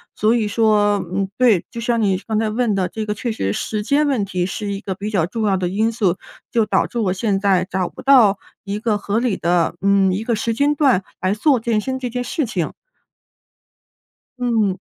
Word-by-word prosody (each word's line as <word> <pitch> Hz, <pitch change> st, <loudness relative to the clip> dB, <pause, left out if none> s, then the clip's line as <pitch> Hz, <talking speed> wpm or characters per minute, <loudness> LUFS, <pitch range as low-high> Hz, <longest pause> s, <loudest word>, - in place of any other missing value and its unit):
所 215 Hz, +2 st, +2 dB
以 225 Hz, -3 st, 0 dB
说， 210 Hz, -1 st, +3 dB, 0.2 s
嗯， 195 Hz, +1 st, 0 dB
对， 235 Hz, -8 st, +4 dB
就 235 Hz, -, -7 dB
像 235 Hz, 0 st, 0 dB
你 195 Hz, -3 st, +2 dB
刚 220 Hz, -1 st, -1 dB
才 220 Hz, -1 st, 0 dB
问 225 Hz, -1 st, 0 dB
的 190 Hz, -2 st, 0 dB
这 220 Hz, -1 st, -5 dB
个 210 Hz, -, -2 dB
确 230 Hz, +3 st, -3 dB
实 95 Hz, -, -2 dB
时 210 Hz, -, -3 dB
间 290 Hz, +6 st, +2 dB
问 260 Hz, -8 st, +1 dB
题 185 Hz, -2 st, -2 dB
是 205 Hz, +1 st, -4 dB
一 195 Hz, -, -4 dB
个 195 Hz, -2 st, -5 dB
比 205 Hz, +3 st, -5 dB
较 185 Hz, -6 st, +1 dB
重 220 Hz, +3 st, -3 dB
要 195 Hz, -2 st, +2 dB
的 180 Hz, -1 st, -1 dB
因 220 Hz, +5 st, +1 dB
素， 200 Hz, -5 st, 0 dB, 0.3 s
就 230 Hz, -2 st, +2 dB
导 210 Hz, -, +1 dB
致 -, -, -7 dB
我 200 Hz, -6 st, +1 dB
现 195 Hz, 0 st, 0 dB
在 190 Hz, -2 st, +2 dB
找 185 Hz, -1 st, -1 dB
不 -, -, -12 dB
到 240 Hz, -8 st, +5 dB, 0.2 s
一 200 Hz, +1 st, -4 dB
个 220 Hz, -1 st, 0 dB
合 205 Hz, +2 st, -1 dB
理 235 Hz, -5 st, 0 dB
的， 170 Hz, 0 st, +1 dB
嗯， 195 Hz, -1 st, +3 dB
一 200 Hz, +4 st, -2 dB
个 235 Hz, 0 st, 0 dB
时 230 Hz, +2 st, -1 dB
间 285 Hz, +3 st, +2 dB
段 270 Hz, -10 st, +2 dB, 0.2 s
来 185 Hz, +1 st, +1 dB
做 265 Hz, +3 st, +3 dB
健 225 Hz, -1 st, 0 dB
身 260 Hz, +4 st, -3 dB
这 250 Hz, -, -3 dB
件 245 Hz, +1 st, -3 dB
事 295 Hz, +4 st, -2 dB
情。 180 Hz, -7 st, -2 dB, 1.7 s
嗯。 225 Hz, -6 st, +1 dB
210 Hz, 240 characters per minute, -20 LUFS, 195-235 Hz, 1.7 s, 到